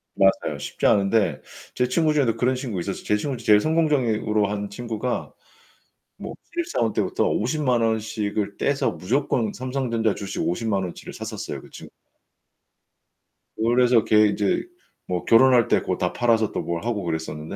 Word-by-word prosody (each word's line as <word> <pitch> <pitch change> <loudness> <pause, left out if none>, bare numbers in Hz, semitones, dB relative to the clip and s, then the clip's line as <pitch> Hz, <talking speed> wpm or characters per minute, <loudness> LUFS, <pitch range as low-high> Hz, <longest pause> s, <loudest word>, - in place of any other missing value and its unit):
맞아요, 95 0 +2
쉽지 - - -4
않은데. 100 -2 +2 0.3
제 125 - +1
친구 155 +4 +2
중에도 135 -7 +2
그런 130 +1 +1
친구가 120 -9 -4
있었어요. 100 +2 -5
제 105 - +1
친구 135 +4 -3
중에 115 - -12
제일 105 -1 +6
성공적으로 125 -10 +1
한 100 0 -4
친구가 115 +3 -4 0.9
뭐 - - -7 0.2
신입사원 335 - -1
때부터 - - 0
500,000 125 0 0
원 110 -1 +2
씩을 105 -1 -3
떼서 140 -1 0
무조건 115 +1 -1
삼성전자 125 -4 -1
주식 100 -1 -5
500,000 100 +2 -1
원어치를 90 -2 -7
샀었어요, - - -6
그 - - -15
친 - - -11 1.7
그걸로 120 +3 +2
해서 120 -2 +4
걔 105 0 +5
인제 100 -1 0 0.4
뭐 90 -1 -3
결혼할 120 0 +5
때 - - +2
고걸 - - -2
다 - - -1
팔아서 115 -3 +2
또 - - -2
뭘 85 +1 -4
하고 115 -4 -1
그랬었는데 80 0 -4
115 Hz, 340 characters per minute, -23 LUFS, 100-125 Hz, 1.7 s, 제일